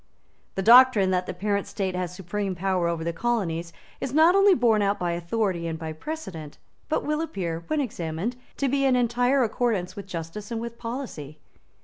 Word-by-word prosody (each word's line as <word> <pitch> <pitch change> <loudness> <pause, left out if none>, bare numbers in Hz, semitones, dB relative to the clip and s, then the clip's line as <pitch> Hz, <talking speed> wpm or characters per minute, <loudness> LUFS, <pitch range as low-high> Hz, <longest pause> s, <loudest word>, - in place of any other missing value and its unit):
The 195 - -1
doctrine 230 -4 +7
that 180 0 0
the - - -3
parent 200 +1 -1
state 190 -2 -2
has 180 -1 -2
supreme 190 +2 -3
power 185 -1 0
over 170 -1 -2
the 170 +1 -2
colonies 175 -6 -1 0.3
is 270 +1 -4
not 320 +3 +6
only 395 -1 +6
borne 230 -3 +3
out 200 0 +1
by 175 -1 -1
authority 170 0 -1
and 165 -1 -3
by 160 -1 -5
precedent, 165 - -7 0.3
but 310 - 0
will 300 +1 0
appear, 170 - -3
when 310 - 0
examined, 190 - -3 0.2
to 275 - +1
be 275 +1 +1
in 265 -2 +4
entire 245 +2 +2
accordance 220 -5 -1
with 200 -1 -8
justice 175 +4 -6
and 230 -1 -3
with 235 0 -7
policy. 230 - -6
200 Hz, 190 wpm, -25 LUFS, 170-245 Hz, 0.3 s, doctrine